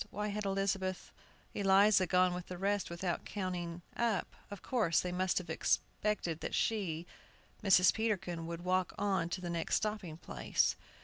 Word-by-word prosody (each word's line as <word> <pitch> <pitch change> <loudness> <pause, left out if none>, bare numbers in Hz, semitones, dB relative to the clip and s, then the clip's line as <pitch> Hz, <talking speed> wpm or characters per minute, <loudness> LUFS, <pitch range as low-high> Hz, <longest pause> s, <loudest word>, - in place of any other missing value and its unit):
Why 210 +2 -3
had 210 0 -3
Elizabeth 195 -1 -1 0.4
Eliza 195 -1 +5
gone 180 0 +3
with 180 0 -5
the 180 - -6
rest 200 +2 0
without 170 0 -2
counting 175 -3 -4
up? 230 -5 0
Of 205 - -9
course, 215 -11 +2
they 180 - -2
must 185 +1 0
have 180 - -1
expected 190 -6 -1
that - - -3
she 180 -7 0 0.6
Mrs. 185 -2 +6
Peterkin 190 -7 -2
would 170 +1 -6
walk 185 0 +1
on 190 -4 0
to 180 - -3
the 175 - -4
next 165 -1 0
stopping 210 -7 -2
place!" 65 - 0
185 Hz, 160 wpm, -34 LUFS, 175-200 Hz, 0.6 s, Mrs